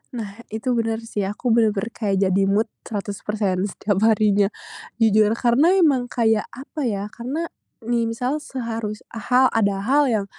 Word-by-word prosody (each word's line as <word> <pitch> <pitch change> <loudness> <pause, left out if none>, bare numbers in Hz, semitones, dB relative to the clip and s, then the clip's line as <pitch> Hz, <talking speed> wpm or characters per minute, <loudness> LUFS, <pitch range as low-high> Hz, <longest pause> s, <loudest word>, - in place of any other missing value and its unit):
Nah, 210 -2 -6
itu 220 +4 -3
bener 225 -1 -1
sih, 210 -3 -3
aku 220 +5 -2
bener-bener 225 -1 +2
kayak 205 -4 -1
jadi 190 +1 +2
mood 210 +3 +1 0.2
100% 205 -2 -2
setiap 205 -1 -1
harinya. 210 -2 +3 0.5
Jujur, 215 -1 +3
karena 260 +10 +3
emang 285 -9 +3
kayak 225 -3 +1
apa 280 +4 -8
ya, 205 -1 -3
karena, 265 +8 -4 0.3
nih 230 -1 -1
misal 250 +6 -2
seharus 230 -6 -5
ha 250 +3 +3
ada 200 -3 +2
hal 280 +3 +3
yang 215 -4 0
225 Hz, 150 wpm, -22 LUFS, 205-245 Hz, 0.5 s, harinya